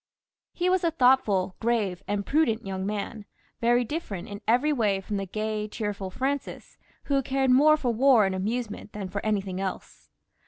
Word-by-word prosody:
He 355 - -1
was 370 0 +2
a 335 - +3
thoughtful, 245 - +3
grave, 220 -6 0
and 200 0 -2
prudent 275 -8 +1
young 190 0 -3
man, 210 +1 -4 0.3
very 240 +1 +3
different 225 - -5
in 205 +1 -8
every 250 +7 +3
way 210 -7 +1
from 200 +2 -4
the 195 0 -3
gay, 215 +2 -3
cheerful 205 -3 -4
Francis, 270 +7 -4 0.2
who 275 -1 +1
cared 265 0 +1
more 300 +4 +6
for 250 -5 -1
war 245 -2 +5
and 190 - -1
amusement 210 +2 -3
than 200 -3 -5
for 200 +2 -4
anything 195 -3 -1
else. 190 -1 -6
215 Hz, 170 wpm, -26 LUFS, 200-265 Hz, 0.3 s, more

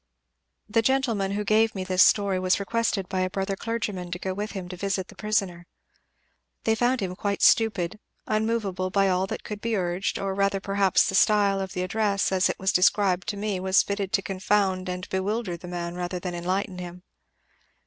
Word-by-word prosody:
"The 225 +2 +2
gentleman 230 -6 +1
who 210 +1 -1
gave 215 +2 +2
me 190 - -3
this 185 0 +2
story 200 -3 +4
was 185 +1 +2
requested 205 -2 -1
by 190 0 -2
a 185 0 +1
brother 195 +1 -2
clergyman 210 -5 -3
to 180 - -4
go 190 +1 -3
with 210 +3 -4
him 190 -3 -5
to 180 - -6
visit 190 0 -2
the - - -13
prisoner. 195 -5 -1 1.0
They 225 - +2
found 245 +2 +1
him 185 -2 -3
quite 200 0 -2
stupid 215 -3 +3 0.3
unmovable 215 -4 -1
by 195 0 +2
all 185 +1 +1
that - - -5
could 210 -1 -6
be 230 -1 -1
urged, 180 0 -1
or 195 -1 -2
rather 200 0 +1
perhaps 195 -1 +2
the 195 - -2
style 205 -1 +3
of 190 -1 -5
the 180 - -2
address, 200 +1 0
as 190 -1 +2
it - - -2
was 190 0 +1
described 185 0 +3
to 210 -1 -2
me, 205 -2 -2
was 190 +1 +3
fitted 200 -1 -3
to 195 - +2
confound 190 -1 0
and 180 0 -4
bewilder 190 0 -2
the 175 +1 -10
man 175 -1 -4
rather 180 +1 -3
than 180 0 -5
enlighten 185 +2 -2
him. 180 0 -8
195 Hz, 200 wpm, -26 LUFS, 185-210 Hz, 1.0 s, story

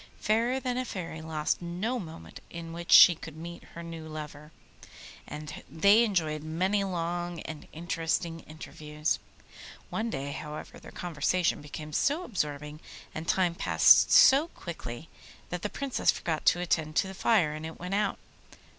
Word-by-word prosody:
Fairer 235 +4 +1
than 255 -1 -2
a - - 0
Fairy 170 -8 -6
lost 155 0 -1
no 185 +9 -2
moment 165 -5 -9
in 165 -1 -7
which 170 0 -6
she 175 - +10
could 160 -1 -10
meet 170 +1 -8
her 170 - -7
lover, 155 -2 -8 0.8
and 150 0 -7
they 200 - +5
enjoyed 160 -8 0
many 185 +6 0
long 175 -2 -3
and 155 -2 -8
interesting 165 0 -2
interviews. 155 0 -3 0.7
One 225 +1 -1
day, 140 -8 -4
however, 150 +1 -7
their - - -12
conversation 175 +1 0
became 150 +1 -8
so 295 - +1
absorbing 150 - -3 0.3
and 160 +1 -6
time 180 -3 +2
passed - - +6
so 280 +5 +7
quickly 160 - -8 0.4
that 180 -1 -3
the 210 - -2
Princess 275 +2 -1
forgot 160 -3 0
to 175 - +5
attend 160 -3 0
to 190 - +2
the 190 - -7
fire, 190 -6 +2
and 155 0 -7
it 160 0 -7
went 180 +2 -5
out. 205 0 +1
170 Hz, 155 wpm, -29 LUFS, 155-190 Hz, 0.8 s, she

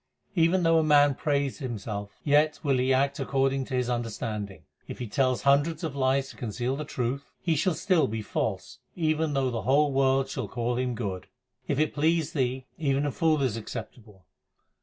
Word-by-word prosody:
Even 175 0 +3
though 165 -1 +4
man 145 -2 +5
praise 140 0 -1
himself, 105 -6 -5
Yet 150 +1 +3
will 135 -4 +2
he 130 +1 +2
act 140 +2 +2
according 135 0 0
to 130 - -4
his 125 -1 0
understanding. 110 -6 -4 0.2
If - - -7
he 125 - -4
tell 130 +3 +1
hundreds 145 +4 +2
of 155 -4 -3
lies 135 0 +1
to - - -16
conceal 120 +1 -2
the 150 +2 -5
truth, 135 +2 -3
He 165 -3 0
shall 160 +3 +1
still 185 -6 +2
be 110 0 -4
false - - -3 0.2
even 155 -2 0
though 135 -2 +1
the 115 -2 -2
whole 140 +6 +3
world 135 0 +2 0.2
call 120 0 -2
him 125 -1 -1
good. 100 -6 -4 0.4
If 140 - 0
it 155 -1 +1
please 160 +1 +1
Thee, 130 -2 -1
even 140 -2 +1
a 145 - 0
fool 155 0 +2
is 125 -5 0
acceptable. 110 -4 -8
135 Hz, 180 wpm, -27 LUFS, 120-150 Hz, 0.4 s, man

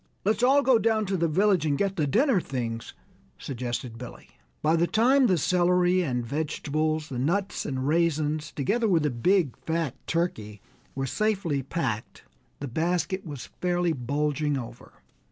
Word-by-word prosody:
"Let's 215 +3 +1
all 275 +3 +5
go 260 -4 +5
down 220 -1 +1
to 195 0 -1
the 170 -2 +1
village 190 +2 +2
and 145 -3 +1
get 195 +2 0
the 155 -4 0
dinner 235 - +3
things," 115 -5 -5 0.4
suggested 120 -2 -5
Billy. 125 -1 -10 0.3
By 155 +2 +3
the 170 +1 +2
time 255 +6 +4
the 185 -4 +3
celery 180 +2 +3
and 125 -7 -1
vegetables, 155 +2 -2
the 125 -3 -4
nuts 190 +9 -1
and 130 -1 -2
raisins, 155 -1 +1
together 225 - 0
with 170 -6 +3
the 150 - +1
big, 160 +4 +2
fat 160 -4 -2
turkey, 110 - -2 0.4
were 135 0 -2
safely 185 -3 0
packed, 125 -6 -4 0.4
the 145 - -4
basket 175 +7 -1
was 145 -4 -7
fairly 175 -1 +1
bulging 145 +2 -1
over. 120 -3 -8
160 Hz, 155 wpm, -26 LUFS, 140-185 Hz, 0.4 s, all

